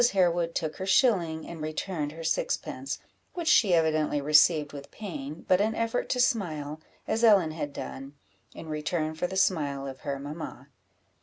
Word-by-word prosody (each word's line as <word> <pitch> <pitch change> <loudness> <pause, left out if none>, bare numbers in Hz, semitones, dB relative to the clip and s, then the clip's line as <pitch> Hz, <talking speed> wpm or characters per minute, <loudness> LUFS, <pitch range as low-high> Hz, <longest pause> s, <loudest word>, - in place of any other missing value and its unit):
Harewood 175 -3 +2
took 155 -1 -2
her 190 - -4
shilling, 175 - +2
and 170 -2 -8
returned 155 0 -3
her 165 +1 -8
sixpence, 135 -4 -2 0.4
which 340 -2 -4
she 195 - +5
evidently 155 -2 +2
received 150 +1 +4
with 140 -1 -9
pain, 155 -7 -7
but 185 +1 +4
an 220 +2 +1
effort 230 +1 -1
to 250 - 0
smile, 155 -11 0 0.3
as 225 - 0
Ellen 200 -8 +6
had 155 -2 -4
done, 135 0 -7 0.4
in 160 - -9
return 155 +1 -2
for 160 +3 -2
the 190 - -5
smile 145 -8 +1
of 135 -1 -7
her 140 -2 -3
mamma. 145 +4 -7
160 Hz, 165 wpm, -28 LUFS, 150-185 Hz, 0.4 s, Ellen